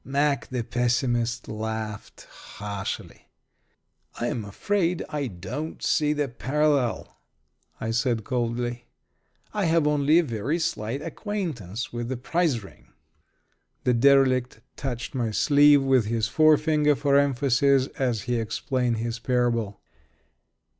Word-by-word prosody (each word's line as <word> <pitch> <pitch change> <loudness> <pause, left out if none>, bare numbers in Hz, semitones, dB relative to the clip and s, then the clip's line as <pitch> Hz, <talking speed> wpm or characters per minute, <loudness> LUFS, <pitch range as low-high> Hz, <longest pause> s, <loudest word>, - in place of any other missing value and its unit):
Mack, 140 +1 0
the 125 -2 -3
pessimist, 120 0 0
laughed 110 0 -5
harshly. 100 -1 -7 0.9
"I'm 120 -1 -2
afraid 175 - -1
I 145 -3 -2
don't 100 - -6
see 150 -2 +2
the 150 -1 0
parallel," 135 0 0 0.6
I 115 - -2
said, 115 -1 0
coldly. 120 0 -2 0.7
"I 205 -2 0
have 165 -1 +3
only 150 +1 +3
a 175 - +5
very 125 +3 -2
slight 125 -5 -2
acquaintance 145 - -4
with 120 0 -4
the 130 - -2
prize 145 - 0
ring." 95 - -15 1.0
The 125 - +3
derelict 130 0 +3
touched 125 -4 -5
my 120 -4 -1
sleeve 145 +4 +5
with 130 -4 +3
his 110 0 0
forefinger, 155 -1 +4
for 140 0 +3
emphasis, 140 -1 +3
as 120 -6 0
he 120 +1 -1
explained 120 +2 -1
his 115 +1 -3
parable. 115 -4 0
125 Hz, 120 wpm, -25 LUFS, 115-145 Hz, 1.0 s, a